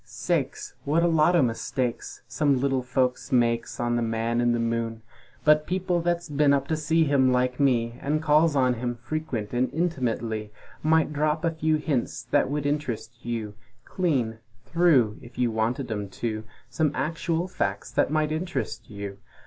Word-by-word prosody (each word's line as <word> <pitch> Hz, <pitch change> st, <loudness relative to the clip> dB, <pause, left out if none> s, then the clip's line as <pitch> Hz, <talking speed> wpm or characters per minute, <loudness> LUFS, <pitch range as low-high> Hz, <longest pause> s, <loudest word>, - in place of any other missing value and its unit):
Sakes! -, -, -2 dB
What 160 Hz, +4 st, +2 dB
a -, -, +4 dB
lot 165 Hz, +1 st, +4 dB
o' 170 Hz, -, +5 dB
mistakes 120 Hz, +1 st, -2 dB
Some 140 Hz, -4 st, +1 dB
little 135 Hz, -1 st, +1 dB
folks 125 Hz, +2 st, -1 dB
makes 120 Hz, -2 st, +1 dB
on 120 Hz, 0 st, +1 dB
the -, -, 0 dB
Man 115 Hz, +1 st, 0 dB
in 120 Hz, 0 st, +3 dB
the 120 Hz, -, +1 dB
Moon! 115 Hz, -1 st, -2 dB, 0.4 s
But 150 Hz, 0 st, +5 dB
people 180 Hz, -1 st, 0 dB
that's 175 Hz, 0 st, -1 dB
been 145 Hz, -1 st, +3 dB
up 140 Hz, -1 st, +1 dB
to 160 Hz, -, +2 dB
see 160 Hz, +2 st, +2 dB
him 140 Hz, -3 st, +3 dB
like 125 Hz, +1 st, +1 dB
Me, 120 Hz, -4 st, +1 dB
And 150 Hz, +2 st, 0 dB
calls 155 Hz, 0 st, +3 dB
on 130 Hz, -2 st, +3 dB
him 120 Hz, 0 st, -3 dB
frequent 120 Hz, -3 st, -4 dB
and 125 Hz, +1 st, +1 dB
intimutly, 120 Hz, -10 st, -1 dB, 0.3 s
Might 160 Hz, 0 st, +2 dB
drop 150 Hz, +2 st, 0 dB
a 165 Hz, -, +2 dB
few 160 Hz, -1 st, +1 dB
hints 145 Hz, -6 st, -1 dB
that 145 Hz, -2 st, +3 dB
would 145 Hz, 0 st, -2 dB
interest 120 Hz, -6 st, -3 dB
you 115 Hz, -3 st, -3 dB, 0.3 s
Clean! 130 Hz, -11 st, -1 dB, 0.3 s
Through! 150 Hz, -11 st, +3 dB
If 120 Hz, -1 st, -14 dB
you 125 Hz, -2 st, +1 dB
wanted 115 Hz, +4 st, -1 dB
'em 105 Hz, -2 st, -3 dB
to 110 Hz, +2 st, -4 dB, 0.2 s
Some 145 Hz, +6 st, +1 dB
actual 165 Hz, +4 st, -1 dB
facts 100 Hz, -, -3 dB
that 120 Hz, -, +2 dB
might 155 Hz, 0 st, +1 dB
interest 175 Hz, +3 st, -3 dB
you! 100 Hz, -2 st, -7 dB
130 Hz, 175 wpm, -26 LUFS, 115-155 Hz, 0.4 s, o